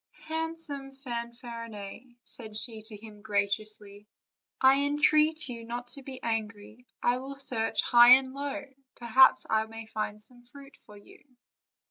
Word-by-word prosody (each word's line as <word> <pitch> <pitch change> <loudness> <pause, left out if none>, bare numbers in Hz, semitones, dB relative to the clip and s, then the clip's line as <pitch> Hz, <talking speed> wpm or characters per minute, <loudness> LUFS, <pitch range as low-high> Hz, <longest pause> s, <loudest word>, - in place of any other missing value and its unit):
"Handsome 320 -4 -3
Fanfarinet," 235 -3 -8
said 215 -2 -5
she 220 0 -3
to 215 -2 0
him 210 -1 -13
graciously, 205 0 -2 0.5
"I 265 +1 +5
entreat 300 +2 +3
you 235 -2 -7
not 240 +1 -6
to 280 - -8
be 260 -1 -9
angry; 225 +1 -4 0.2
I 245 +1 +3
will 270 +2 -7
search 230 -5 0
high 240 +1 +8
and 260 0 -2
low; 285 +1 -4 0.3
perhaps 245 +2 +5
I 220 0 +1
may 225 0 -9
find 215 -1 -4
some 245 +3 -3
fruit 275 +3 -15
for 210 - -16
you." 205 - -18
240 Hz, 140 wpm, -29 LUFS, 220-270 Hz, 0.5 s, high